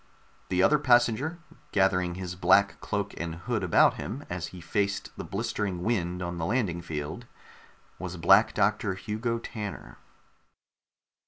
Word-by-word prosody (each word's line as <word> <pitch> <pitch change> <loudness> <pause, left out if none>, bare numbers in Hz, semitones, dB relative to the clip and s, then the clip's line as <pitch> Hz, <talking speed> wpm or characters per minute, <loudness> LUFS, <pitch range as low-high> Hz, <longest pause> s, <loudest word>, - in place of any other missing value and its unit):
The 90 0 +2
other 150 - +5
passenger, 125 +4 +3 0.3
gathering 90 -3 +2
his 90 -1 -5
black 95 +3 +3
cloak 100 -1 -2
and 85 -1 -3
hood 105 +4 -2
around 90 - +4
him 135 +5 -6
as 90 -1 -3
he 90 - -10
faced 100 +3 -2
the - - -6
blistering 95 -4 -3
wind 90 -5 -1
on 85 0 -4
the 80 - -1
landing 100 -7 0
field, 80 +7 -5 0.7
was 90 -1 -5
Black 95 +6 +5
Doctor 105 -1 +1
Hugo 110 +5 -2
Tanner. 105 -3 -7
95 Hz, 140 wpm, -28 LUFS, 90-110 Hz, 0.7 s, other